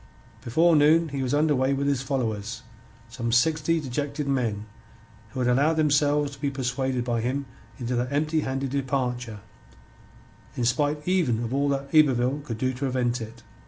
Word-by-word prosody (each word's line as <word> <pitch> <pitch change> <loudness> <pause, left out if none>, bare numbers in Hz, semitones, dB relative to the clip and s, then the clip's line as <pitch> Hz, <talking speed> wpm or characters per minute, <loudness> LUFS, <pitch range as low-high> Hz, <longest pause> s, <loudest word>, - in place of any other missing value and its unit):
Before 165 +8 +3
noon 155 +2 +4
he 140 -1 -3
was 130 -2 -1
under 150 0 +2
way 130 +1 +1
with 140 +1 -1
his 140 -3 +1
followers, 115 -5 -3 0.4
some 115 0 -4
sixty 155 +6 +2
dejected 145 +1 -3
men 115 -6 -1 0.6
who - - -7
had 125 - +1
allowed 140 +6 +3
themselves 145 -1 +2
to 140 - -13
be 145 - 0
persuaded 130 -1 -2
by 120 -2 -1
him 135 +4 -2 0.3
into 125 -1 -3
that 125 +2 -1
empty 155 +2 +1
handed 135 -2 -2
departure 125 -5 -2 1.2
in 120 - 0
spite 145 +5 0
even 155 -12 +1
of 115 +2 -4
all 140 +1 +1
that 140 0 -2
Yberville 140 -2 +3
could 115 -6 -5
do 130 +3 -1
to 125 - -10
prevent 125 -3 -1
it. 115 +1 -9
135 Hz, 170 wpm, -25 LUFS, 125-145 Hz, 1.2 s, noon